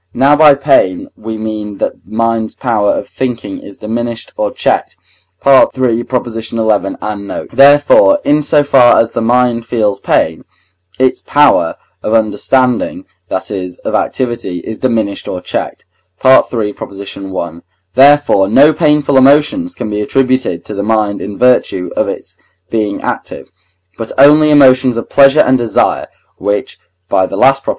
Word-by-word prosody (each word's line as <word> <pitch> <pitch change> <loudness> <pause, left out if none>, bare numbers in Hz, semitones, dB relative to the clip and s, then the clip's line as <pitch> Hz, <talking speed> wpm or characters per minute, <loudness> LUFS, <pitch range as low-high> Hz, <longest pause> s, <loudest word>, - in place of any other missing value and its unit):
Now 140 +2 +4
by 150 -1 +6
pain 135 -10 +1
we 110 0 -7
mean 105 -2 -6
that - - -2
the - - -12
mind's 115 -1 -1
power 110 -5 -1
of - - -4
thinking 120 -6 -5
is 100 - -13
diminished 115 +1 -5
or 105 - -1
checked - - -2 0.5
(III. 135 -1 +6 0.8
xi. 110 +1 -6
and 105 -1 -2
note); - - -7
therefore, 145 - +5
in 150 +1 +2
so 150 0 +2
far 130 -4 +4
as 115 - +1
the 115 - -2
mind 120 0 0
feels 105 -4 -1
pain, 80 0 -1 0.5
its 130 0 0
power 145 - +2 0.3
of 110 - -1
understanding, 115 +3 0 0.2
that 95 - -4
is, 90 -3 -6
of - - -3
activity, 120 -8 -2
is 110 - -8
diminished 110 -6 -2
or 90 - -4
checked - - -5 0.4
(III. 115 -5 +3
i.); 95 -4 -7 0.3
therefore, 140 -7 +4
no 140 +9 +4
painful 150 -3 +1
emotions 150 - +2
can 105 - -5
be 105 0 -2
attributed 130 -6 -1
to - - -7
the 100 - -3
mind 105 -1 -1
in 100 0 -7
virtue 125 -7 +1
of - - 0
its - - -7 0.4
being 105 -3 -2
active, - - -6 0.5
but 115 - -5
only 150 +3 +5
emotions 130 -4 +4
of 115 - -5
pleasure 140 +2 +5
and 130 0 +2
desire, 115 -4 0 0.3
which 100 0 -3 0.3
(by 95 +1 +1
the 95 - -6
last 135 +5 +3
Prop.) - - -5
115 Hz, 150 wpm, -12 LUFS, 105-135 Hz, 0.8 s, by